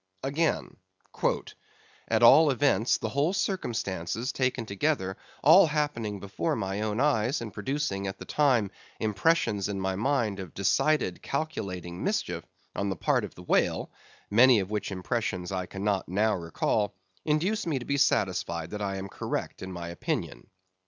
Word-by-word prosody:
Again: 150 +4 -1 1.3
"At - - +2
all 160 -1 +8
events, 135 -3 +2
the - - -3
whole 145 +6 +1
circumstances 115 - -2
taken 130 -2 -1
together, 100 -2 -1 0.3
all 165 +5 +8
happening 145 -9 -1
before 95 -4 -2
my 100 -2 -2
own 110 +1 -1
eyes, 135 -1 +2
and 110 -4 -7
producing, 105 -4 -2
at 95 0 -5
the - - -9
time, 125 -9 +2 0.3
impressions 110 - +1
in 100 -1 -3
my 95 0 -1
mind 110 -3 0
of 95 -4 -8
decided, 100 -1 +1
calculating 95 - -4
mischief, - - -1 0.3
on 100 0 -1
the 95 - -1
part - - +1
of - - -7
the 90 - -11
whale - - +1 0.4
(many 120 +2 +7
of 95 +1 -4
which 105 -1 -2
impressions 95 -2 -2
I 90 -1 -2
cannot 100 -1 -2
now 105 +4 +2
recall), 100 +3 -1 0.3
induce 175 +8 0
me 155 -4 0
to 120 - -5
be 140 - 0
satisfied 90 - +1
that 105 - -5
I 100 -1 -2
am 95 0 -5
correct - - -4
in 95 - -6
my 85 -1 -6
opinion." 85 - -4
105 Hz, 155 wpm, -28 LUFS, 95-140 Hz, 1.3 s, all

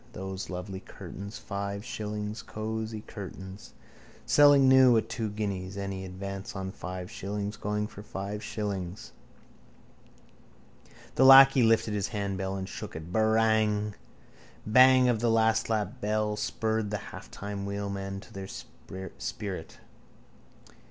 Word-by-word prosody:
Those 95 0 -5
lovely 95 +1 -5
curtains. 100 +2 -9
Five 100 +1 -4
shillings. 105 -2 -4
Cosy 110 0 -4
curtains. 95 -1 -9 0.5
Selling 145 -2 +6
new 130 -2 +7
at 110 0 -1
two 115 -2 -2
guineas. 100 -2 -4
Any 95 -1 -4
advance 95 +2 -6
on 95 -1 -4
five 90 +1 -7
shillings? 105 0 -4
Going 105 0 -2
for 100 - -9
five 105 +1 -5
shillings. 100 -2 -4 2.0
The 130 - +3
lacquey 135 0 +9
lifted 115 -2 +3
his 100 -1 -1
handbell 95 -2 -3
and 95 -1 -4
shook - - -7
it: 80 +2 -7
—Barang! 110 -1 +2 0.7
Bang 130 +3 +6
of 120 -3 +2
the 120 +1 +1
lastlap 110 -2 +1
bell 105 0 0
spurred 110 0 -1
the 105 - -1
halfmile 100 0 -7
wheelmen 100 -1 -4
to - - -16
their 95 -1 -6
sprint. 95 - -7
105 Hz, 120 wpm, -29 LUFS, 95-110 Hz, 2.0 s, lacquey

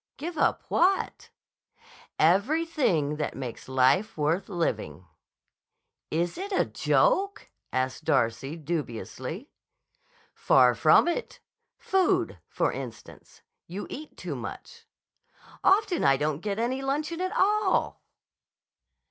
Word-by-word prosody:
"Give 330 +5 -5
up - - +1
what?" 375 +3 +1 0.9
"Everything 195 - +2
that 150 - -3
makes 130 -1 -7
life 130 +12 +2
worth 155 +7 0
living." 105 - -2 1.0
"Is 170 - -1
it 400 +2 -5
a 380 - +2
joke?" 400 -5 +1 0.2
asked 130 0 -2
Darcy, 135 +6 0
dubiously. 155 - -5 0.8
"Far - - +4
from - - +5
it. 345 +8 -3 0.4
Food, 385 -6 +1
for - - 0
instance. - - -10 0.2
You 190 +4 -6
eat 305 +3 -8
too - - -5
much." - - -9 0.8
"Often 385 -2 +3
I 135 0 +5
don't 150 +1 -1
get 200 +2 -3
any 245 +4 -1
luncheon 300 +5 -2
at 370 +5 -2
all." 415 -1 +2
205 Hz, 105 wpm, -27 LUFS, -, 1.0 s, from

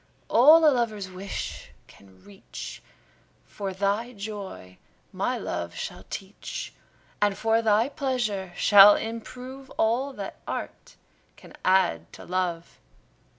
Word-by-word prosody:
All 310 +7 +7
a 295 - +6
lover's 215 -6 -2
wish 190 +2 -6 0.2
can 95 -1 -20
reach, 200 -1 -10 0.6
For 200 -2 -5
thy 200 +6 -1
joy 200 - -8 0.3
my - - -1
love 85 0 -4
shall 90 +2 -6
teach; 195 +1 -7 0.5
And 205 -1 +2
for 225 +1 +2
thy 220 +1 +3
pleasure 245 - -2
shall 205 +1 +8
improve 250 +4 -7
All 240 +5 +1
that 200 -5 -7
art - - -6 0.4
can - - -15
add 185 - +2
to - - -11
love. 175 -2 -3
205 Hz, 115 wpm, -26 LUFS, 185-235 Hz, 0.6 s, shall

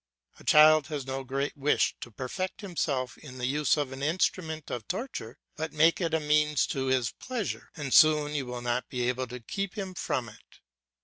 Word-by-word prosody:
A - - -14
child 155 -1 +6
has 150 -4 -4
no 135 0 -4
great 135 +2 -2
wish 145 +1 +2
to - - -7
perfect 135 - -4
himself 145 - -2
in 130 -4 -11
the 125 - -2
use 145 +3 +2
of 145 -3 -1
an 135 +1 -7
instrument 160 0 -1
of 120 -3 -5
torture, 180 - -5 0.2
but 160 -1 -4
make 165 +4 +4
it 165 -2 +1
a - - +2
means 150 0 +2
to 135 -1 -2
his 130 -3 +1
pleasure, 250 -6 -5
and 145 -5 -4
soon 150 -2 +6
you 140 -4 -2
will 125 0 -5
not 120 +1 -1
be 125 -1 -1
able 125 +1 -1
to 125 +1 -7
keep 195 - -4
him 190 -2 -4
from 130 -8 -2
it. 110 - -16
145 Hz, 200 wpm, -29 LUFS, 130-160 Hz, 0.2 s, child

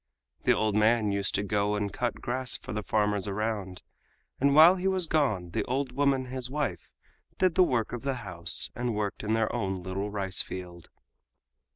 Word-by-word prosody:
The - - +5
old 110 -1 0
man 110 0 +2
used 100 -1 -1
to 100 - 0
go 105 0 0
and 105 -1 -3
cut 120 -1 -2
grass 125 +1 -2
for - - -9
the 105 - -3
farmers 105 -1 0
around, 100 -3 -4 0.6
and 140 +1 +3
while 165 +4 +8
he 185 +1 -2
was 190 -2 +1
gone 110 - 0
the - - -1
old 130 +1 -2
woman, 135 0 +1
his 130 0 -4
wife, 135 - -3 0.5
did 185 -2 +2
the 185 - +3
work 120 -11 +1
of 120 - -4
the 135 -1 -2
house 85 -1 +4
and 120 -1 -3
worked 105 -1 -3
in 110 +1 -1
their 110 -1 0
own 95 -2 -3
little 95 +3 -4
rice 95 -2 +2
field. 90 -2 -9
110 Hz, 190 wpm, -28 LUFS, 100-130 Hz, 0.6 s, while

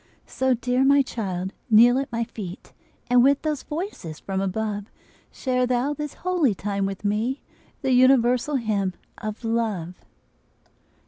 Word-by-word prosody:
So, 260 -1 +1
dear 250 +2 +1
my 280 +1 +5
child, 190 -6 -4 0.2
kneel 240 +4 +6
at 275 - -4
my 235 0 -1
feet, 205 -5 -8 0.3
And 245 0 +5
with 280 +1 +3
those 305 -3 -1
voices 300 - -6
from 190 -1 -3
above 205 +1 -2 0.5
Share 255 -1 0
thou 250 +3 +1
this 295 0 -6
holy 340 - +2
time 200 0 -2
with 195 +1 -6
me, 220 +6 -1 0.4
The 265 - +1
universal 255 +2 +4
hymn 205 -7 -1 0.2
of 215 +1 -6
love. 220 -7 -1
235 Hz, 140 wpm, -24 LUFS, 205-265 Hz, 0.5 s, kneel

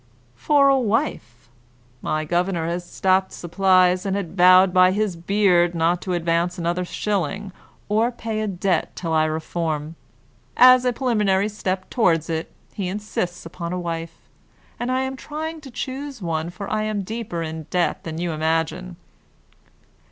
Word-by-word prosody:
"For 280 - +3
a 275 -1 +4
wife. 215 - -2 0.5
My 155 0 -1
governor 175 +1 0
has 170 +1 -2
stopped 190 +1 +1
supplies, 185 +1 +2
and 195 -1 -1
has 200 -2 -1
vowed 185 +1 +5
by 185 0 +5
his 205 -2 -1
beard 175 -1 +2
not 170 +2 +1
to 185 - -3
advance 170 +1 0
another 175 +1 -1
shilling, 195 +1 -2 0.4
or 220 +3 +2
pay 225 -2 -4
a 215 - -1
debt, 185 -3 -1
till 165 -3 -3
I 155 0 +3
reform. 155 -1 -3 0.6
As 255 0 +7
a 250 - +3
preliminary 210 -6 +1
step 190 -2 -3
toward 165 - +2
it, 160 0 -3 0.2
he 195 -3 -3
insists 180 -3 -4
upon 170 +1 -6
a 180 - -2
wife, 165 -1 -5 0.6
and 240 +1 -2
I 260 +1 +1
am 265 0 -3
trying 315 +3 -6
to 280 - -11
choose 265 +2 -5
one 165 -3 -2
for 190 +3 -7
I 215 - -1
am 215 -2 -2
deeper 210 -5 -4
in 160 -1 -6
debt 180 -1 0
than 160 -1 -6
you 175 0 -2
imagine." 165 +3 -1
185 Hz, 160 wpm, -22 LUFS, 170-215 Hz, 0.6 s, As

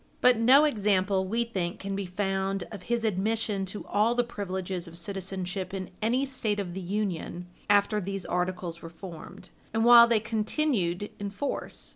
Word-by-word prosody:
But 250 0 +6
no 255 +6 +6
example, 200 -6 +1
we 230 +4 +1
think, 185 -7 -3
can 195 0 -4
be 195 -1 -3
found 195 0 -1
of 205 -4 -7
his 235 +3 -1
admission 210 0 0
to 205 +3 -6
all 215 +4 +2
the 245 - +3
privileges 190 -5 -4
of 170 0 -9
citizenship 190 +1 -4
in 190 -1 -5
any 245 +5 +2
State 225 -6 0
of 180 -3 -4
the 190 - -5
Union 180 -2 -3 0.2
after 205 +1 +3
these 195 0 -4
Articles 180 -1 -2
were 165 - -8
formed, 175 +2 -10 0.2
and 225 +1 +2
while 235 -1 +9
they 230 -2 +3
continued 215 - -1
in 205 0 -3
force. 205 +8 -3
200 Hz, 170 wpm, -28 LUFS, 185-225 Hz, 0.2 s, while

